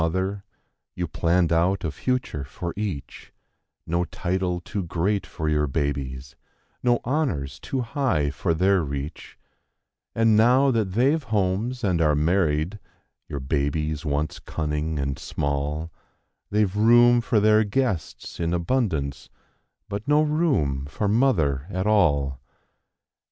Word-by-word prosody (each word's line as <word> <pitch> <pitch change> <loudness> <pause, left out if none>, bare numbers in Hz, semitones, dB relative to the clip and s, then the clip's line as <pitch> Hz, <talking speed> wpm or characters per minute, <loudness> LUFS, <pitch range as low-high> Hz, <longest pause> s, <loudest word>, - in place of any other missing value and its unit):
Mother; 95 +4 -1 0.5
you 90 -1 -2
plan¬ 85 +3 +1
ned 85 - -1
out 90 +4 +2
a 80 - -1
future 125 - -2 0.3
each; 95 -9 -5 0.5
No 85 +2 0
title 90 0 -2
too 95 +4 -4
great 90 +4 -1
for 80 - -4
your 75 -1 +2
babies; 70 -2 -3 0.5
no 120 -1 +2
honors 115 - -1
too 130 - -3
high 115 - 0
for 85 +3 -1
their 95 +1 +3
reach; 70 +1 -6 0.8
And 115 -1 +4
now 125 +5 +5
that 110 -6 0
they've 135 +9 +3
homes 110 +2 -1
and 90 -5 +1
are 75 -2 +3
married—your 80 -1 -2
ba¬ 70 +2 0
bies 75 0 -3
once 75 0 -2
cunning 75 0 -3
and 70 -1 -2
small— 75 +3 -2 0.6
ve 105 +1 +3
room 120 +5 +5
for 115 -1 +2
their 110 +1 +5
guests 105 - -2
in 85 0 0
abund 85 - -1 0.6
but 105 +1 -5
no 150 +1 +4
room 135 - 0
for 100 +9 -2
Mother 90 - +2
at 95 -1 -2
all. 70 -11 +2
90 Hz, 130 wpm, -24 LUFS, 75-110 Hz, 0.8 s, now